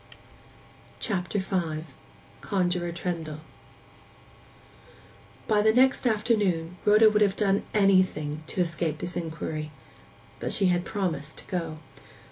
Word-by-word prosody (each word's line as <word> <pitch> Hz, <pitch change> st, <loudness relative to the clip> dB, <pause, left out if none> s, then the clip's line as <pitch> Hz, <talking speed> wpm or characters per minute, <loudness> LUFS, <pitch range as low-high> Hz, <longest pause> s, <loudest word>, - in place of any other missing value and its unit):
CHAPTER 195 Hz, -2 st, -1 dB
V—CONJUROR 175 Hz, 0 st, -3 dB
TRENDLE 165 Hz, -3 st, -4 dB, 2.1 s
By 210 Hz, -2 st, +3 dB
the 220 Hz, +1 st, +5 dB
next 255 Hz, +2 st, +3 dB
afternoon 200 Hz, -7 st, +1 dB
Rhoda 215 Hz, +1 st, +7 dB
would 215 Hz, 0 st, +3 dB
have 200 Hz, -2 st, +3 dB
done 200 Hz, -1 st, +2 dB
anything 185 Hz, -7 st, +2 dB
to 185 Hz, -, -1 dB
escape 165 Hz, -2 st, -1 dB
this 175 Hz, +3 st, -4 dB
inquiry. 160 Hz, -2 st, -4 dB, 0.7 s
But -, -, -3 dB
she 195 Hz, -, +3 dB
had 175 Hz, 0 st, +1 dB
promised 160 Hz, -8 st, -3 dB
to -, -, -10 dB
go. 165 Hz, -4 st, -3 dB
180 Hz, 105 wpm, -27 LUFS, 165-205 Hz, 2.1 s, Rhoda